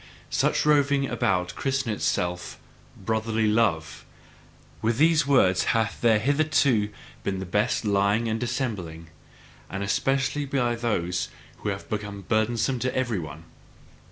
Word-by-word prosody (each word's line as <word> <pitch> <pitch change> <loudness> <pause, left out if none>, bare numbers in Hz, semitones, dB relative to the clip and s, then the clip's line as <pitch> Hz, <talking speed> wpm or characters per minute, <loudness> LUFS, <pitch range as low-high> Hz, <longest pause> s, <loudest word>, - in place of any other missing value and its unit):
Such - - +1
roving 140 -2 +3
about 90 -7 0
christeneth 135 -5 -1
itself 90 0 -2 0.4
"brotherly 110 +2 -1
love"; 105 -8 +1 0.8
with 115 +1 +1
these 160 0 +4
words 95 -10 +4
hath 110 -2 -1
there 115 -2 +5
hitherto 140 -3 +2 0.3
been 95 -1 -1
the 95 - -4
best 105 +6 0
lying 100 +3 +2
and 110 0 -1
dissembling, 105 - -3 0.6
and 95 +1 -4
especially 135 +7 0
by 130 -3 0
those 105 -7 -1 0.3
who - - -3
have 95 -1 -5
been 105 -2 -4
burdensome 115 +5 0
to 130 +2 -2
every 120 -6 0
one. 80 0 -8
110 Hz, 130 wpm, -26 LUFS, 100-130 Hz, 0.8 s, there